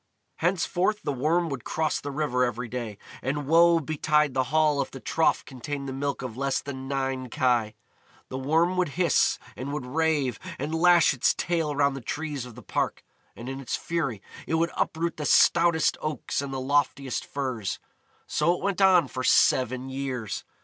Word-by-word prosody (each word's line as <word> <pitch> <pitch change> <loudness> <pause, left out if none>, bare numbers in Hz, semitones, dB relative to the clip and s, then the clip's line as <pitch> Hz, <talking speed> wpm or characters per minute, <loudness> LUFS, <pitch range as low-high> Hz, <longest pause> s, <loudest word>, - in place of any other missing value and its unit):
Henceforth 180 +4 0
the 145 - -1
Worm 160 +6 +1
would 135 -5 -5
cross 160 -1 -1
the 145 - -5
river 140 -3 0
every 120 0 -2
day, 115 -4 -5 0.2
and 145 +3 -2
woe 165 +3 +5
betide 150 -1 +1
the 130 0 +1
Hall 150 0 +2
if - - -3
the 135 - -9
trough 160 +5 +1
contained 140 +1 -6
the 135 - -4
milk 140 0 -3
of 125 -4 -5
less 135 +1 0
than 135 -1 -7
nine 135 -2 -2
kye. 120 -6 +1 0.5
The 130 - -4
Worm 165 +7 +2
would 180 - +2
hiss, 175 -2 +3 0.2
and 135 +3 -5
would 145 -3 -4
rave, 145 -3 0 0.2
and 145 +4 -4
lash 170 -1 +5
its 130 - +2
tail 165 -4 -1
round 140 -1 +2
the 135 - -6
trees 145 0 -4
of 120 - -12
the - - -12
park, - - -2 0.3
and 120 - -9
in 135 +1 -5
its 135 - -3
fury 140 - -3 0.2
it 160 - 0
would 165 +1 +1
uproot 165 +1 -1
the 150 - -4
stoutest 165 0 +4
oaks 155 -3 -2
and 140 -1 -5
the 135 - -3
loftiest 135 -2 0
firs. 130 -8 -3 0.5
So 170 +4 +1
it - - -8
went 200 -1 0
on 185 -6 +6
for 130 0 -5
seven 130 +1 +3
years. 130 -5 -4
140 Hz, 185 wpm, -26 LUFS, 130-160 Hz, 0.5 s, on